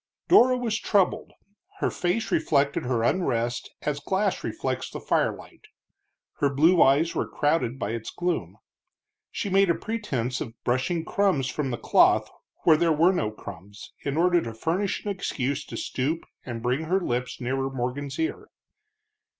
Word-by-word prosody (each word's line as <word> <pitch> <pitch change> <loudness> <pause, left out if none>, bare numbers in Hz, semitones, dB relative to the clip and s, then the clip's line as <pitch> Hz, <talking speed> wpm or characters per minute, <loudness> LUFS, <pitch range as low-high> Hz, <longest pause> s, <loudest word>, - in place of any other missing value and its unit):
Dora 255 -8 +6
was 230 -3 -1
troubled; 200 -3 +1 0.5
her - - 0
face 180 +6 -1
reflected 145 -4 +1
her 120 -2 0
unrest 120 -6 0
as 145 -1 -1
glass 190 +7 -1
reflects - - -3
firelight, - - -2 0.7
her 145 - +2
blue 160 +6 +4
eyes 150 +5 +4
were - - -1
clouded 145 -5 0
by 105 -4 -3
its 115 -1 -4
gloom. 175 0 -3 0.7
She - - -4
made 195 -1 +3
a 170 - +3
pretense 135 - -3
of 115 - -6
brushing 150 +7 0
crumbs 180 -12 +1
from 145 -3 -2
the 120 - -2
cloth - - +3 0.3
where 160 -2 +6
there 170 0 +2
were 165 +5 +4
no 110 - 0
crumbs, 100 -1 -11
in 140 +1 -3
order 175 0 +4
to 115 -5 -6
furnish 175 - -1
an 205 - -1
excuse 140 -7 -2
to - - -7
stoop 150 +6 -2 0.2
and 115 -3 -6
bring 130 +6 0
her 185 +4 +2
lips 125 -5 -2
nearer 135 +2 -1
Morgan's 135 +2 -4
ear. 325 +4 -2
145 Hz, 155 wpm, -26 LUFS, 125-180 Hz, 0.7 s, Dora